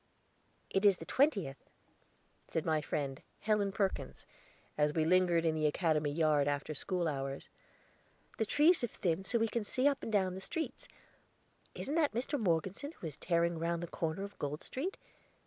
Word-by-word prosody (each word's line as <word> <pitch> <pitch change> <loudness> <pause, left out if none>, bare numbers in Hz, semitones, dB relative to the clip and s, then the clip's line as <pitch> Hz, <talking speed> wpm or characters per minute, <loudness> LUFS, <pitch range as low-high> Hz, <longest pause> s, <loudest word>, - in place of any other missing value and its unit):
"It 195 - +1
is 200 -3 +6
the 165 - -8
twentieth," 195 - +1 0.8
said 160 - -2
my 155 -1 +2
friend, 140 -2 -3 0.2
Helen 210 -2 +2
Perkins, 195 -1 -2 0.5
as 150 0 +1
we 160 -1 +2
lingered 175 -1 +4
in 160 - +3
the 155 -1 +2
Academy 155 -1 +1
yard, 150 -2 +3
after 145 +2 -1
school 175 +3 -1
hours. 135 -2 -3 0.9
"The 220 - +2
trees 315 - +5
have 240 - -1
thinned 185 0 -1
so 240 - +2
we 225 0 +2
can 225 0 -2
see 255 +6 +1
up 280 -1 +1
and - - -4
down 190 -3 +2
the 190 - -6
streets. 320 - -4 0.9
Isn't 285 - -4
that 310 -5 +2
Mr. 260 +5 -1
Morgeson 190 - 0
who - - -10
is 155 -4 -4
tearing 170 -1 +1
round 170 +1 -1
the - - -3
corner 165 +3 -2
of 200 0 -9
Gold 145 +1 -3
Street? 340 +10 -4
175 Hz, 175 wpm, -34 LUFS, 155-215 Hz, 0.9 s, is